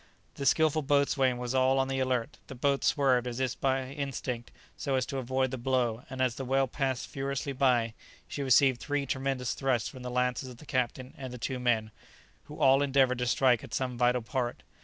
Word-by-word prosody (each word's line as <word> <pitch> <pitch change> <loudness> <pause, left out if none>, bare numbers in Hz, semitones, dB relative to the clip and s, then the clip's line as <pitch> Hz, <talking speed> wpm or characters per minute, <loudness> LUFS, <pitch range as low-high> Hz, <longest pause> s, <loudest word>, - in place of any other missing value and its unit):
The 140 - -3
skilful 155 -1 +3
boatswain 140 -3 +2
was 125 0 -3
all 130 0 +3
on 135 0 +2
the 135 0 -2
alert; 130 +2 -1
the 135 - -8
boat 140 +2 +1
swerved, 130 -4 +3
as 120 0 -4
if 130 -2 -2
by 135 -1 +1
instinct, 135 -4 -4 0.3
so 135 -2 -2
as 130 -1 +1
to 135 - -4
avoid 130 +1 0
the 130 - -4
blow, 125 -2 0
and 130 -1 -5
as 125 -2 +1
the 135 - -6
whale 135 +1 +1
passed 130 -1 -2
furiously 140 0 -3
by, 125 -4 +2 0.3
she 145 - -5
received 130 -1 +4
three 145 -1 -1
tremendous 130 -2 -1
thrusts 130 -4 0
from 130 - -11
the 125 - -5
lances 125 +1 -1
of 125 - -11
the 155 - -14
captain 130 -1 -2
and 130 -2 -6
the 125 - -7
two 125 +2 -3
men, 115 -3 +1 0.5
who 150 - -10
all 135 -1 +5
endeavoured 135 -3 +3
to 125 - -1
strike 125 -1 +3
at - - -6
some 130 -2 -2
vital 125 0 +2
part. 120 0 -3
130 Hz, 210 wpm, -29 LUFS, 125-135 Hz, 0.5 s, all